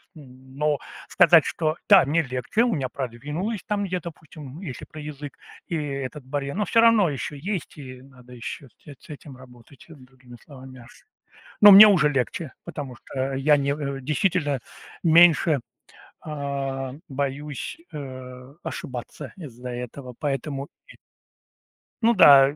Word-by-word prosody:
Н 130 -3 -15
но 150 -1 +1 0.3
сказать, - - +5
что 155 -1 -2
та, 200 -8 +7
мне 160 +4 +1
легче. 130 - -1
У 240 -2 +1
меня 135 -4 -2
продвинулось 150 - -4
там 205 -2 -1
где-то, 180 -2 -4
допустим, 155 -1 -12
если 145 -10 -7
про 155 - -12
язык 150 -1 -8 0.3
и 170 - -3
этот 140 -2 -5
барьер, 140 +1 -4
но 210 +1 0
всё 230 - +3
равно 230 -4 +5
ещё 145 +1 -5
есть, 180 +4 -5
и 130 -3 -10
надо 125 -2 -17
ещё 125 +3 -7
с - - -31
эт 145 -2 -11
с - - -20
этим 140 -2 -11
работать, 125 +1 -17
э, - - -11
другими 130 -2 -16
словами 130 -2 -13
мяс 120 0 -15 0.7
Но 205 - +10
мне 200 +2 +11
уже 180 -8 +4
легче, 140 +2 -2
потому 135 -4 -7
что 135 0 -3
я 145 +3 +3
не 140 0 0
э, 140 -2 -4
действительно 150 -1 0 0.4
меньше, 165 -3 +5 0.7
а, 140 -3 -4 0.2
боюсь, 140 - -4
э, 130 -2 -9
ошибаться 130 +2 -7
из-за 125 -7 -9
этого, 125 +1 -7
поэтому 140 -1 -3 0.2
и - - -15 1.1
Ну 230 +1 +4
да. 140 -7 +7
140 Hz, 150 wpm, -24 LUFS, 130-155 Hz, 1.1 s, мне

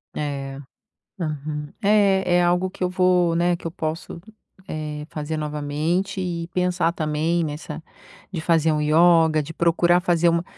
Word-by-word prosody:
É, 140 -2 -4 0.6
uhum. 150 -2 -4
É 195 -3 +3
é 175 - +3
algo 180 +2 +2
que 185 - -6
eu 180 - +1
vou, 180 -2 +2
né, 175 +1 +2
que 170 - -6
eu - - -6
posso, 160 +1 -5 0.5
eh, 150 -1 -5
fazer 155 +1 -4
novamente 150 +6 -2
e 170 -2 -3
pensar 180 -2 +1
também 160 +1 0
nessa, 155 +1 -6 0.5
de 180 - -4
fazer 160 -1 +2
um 155 - 0
ioga, 160 0 +4
de 160 +3 -8
procurar 175 +1 +3
fazer 175 -1 +2
uma 170 0 +1
165 Hz, 155 wpm, -23 LUFS, 150-175 Hz, 0.6 s, ioga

